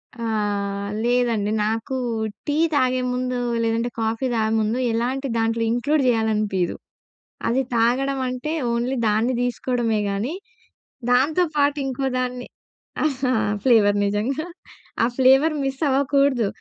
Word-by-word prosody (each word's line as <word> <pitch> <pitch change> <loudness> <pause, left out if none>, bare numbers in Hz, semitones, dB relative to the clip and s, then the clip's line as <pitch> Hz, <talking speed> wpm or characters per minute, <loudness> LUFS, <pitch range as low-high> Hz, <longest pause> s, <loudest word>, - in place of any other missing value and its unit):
ఆ! 235 -1 -5 0.8
లేదండి 235 -4 +1
నాకు 225 +4 -2 0.5
టీ 290 - 0 0.2
తాగే 255 -2 +2
ముందు, 250 0 -2 0.2
లేదంటే 230 +1 0
కాఫీ 225 +3 -1
తాగే 220 -1 +1
ముందు, 220 +2 0
ఎలాంటి 255 +4 -1
దాంట్లో 225 0 0
ఇంక్లూడ్ 280 +6 +1
చేయాలనిపియ్యదు. 215 -6 +1 0.7
అది 250 +3 +2
తాగడం 260 +4 +1
అంటే, 255 +5 -3 0.2
ఓన్లీ 240 +3 -1
దాన్ని 220 +4 +1
తీసుకోవడమే 245 -2 0
కానీ, 210 +9 -2 0.8
దాంతో 290 +8 +3
పాటు 285 0 +2
ఇంకోదాన్ని 255 -1 -2 1.2
ఫ్లేవర్ 210 -5 +4
నిజంగా, 230 +10 -1 0.6
ఆ - - +5
ఫ్లేవర్ 270 +4 +5
మిస్ 270 0 -3
అవ్వకూడదు. 275 -3 +2
245 Hz, 110 wpm, -22 LUFS, 225-265 Hz, 1.2 s, ఆ